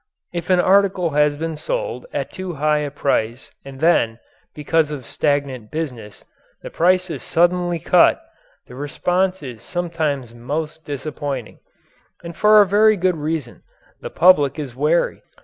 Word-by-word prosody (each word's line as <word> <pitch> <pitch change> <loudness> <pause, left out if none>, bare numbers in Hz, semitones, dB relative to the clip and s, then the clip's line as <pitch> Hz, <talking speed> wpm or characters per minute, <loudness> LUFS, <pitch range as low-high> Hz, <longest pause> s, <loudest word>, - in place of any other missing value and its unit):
If 170 -1 -5
an 185 -1 +4
article 190 -2 +3
has 150 0 +2
been 160 +1 -4
sold - - -4
at - - -4
too 185 -3 -6
high 150 +1 +1
a 150 -1 -3
price 130 -4 -2
and 135 -1 -11
then, 135 -8 +2 0.4
because 155 +1 +1
of 145 -5 -6
stagnant 140 -7 -2
business, 125 -10 -6 0.4
the - - -8
price 180 +1 +2
is 145 - -5
suddenly 175 0 +1
cut, - - +4 0.5
the - - -14
response 180 +6 -1
is 120 -5 -8
sometimes 155 -7 -3
most 150 +6 -5
disappointing. 140 -3 -5 0.6
And 170 -1 -8
for 210 +2 +6
a - - -4
very 215 +2 +4
good 180 -1 +1
reason. 150 -4 -4 0.4
The - - -6
public 165 -6 +4
is 140 -6 -6
wary. 150 +5 +1
155 Hz, 150 wpm, -20 LUFS, 140-175 Hz, 0.6 s, for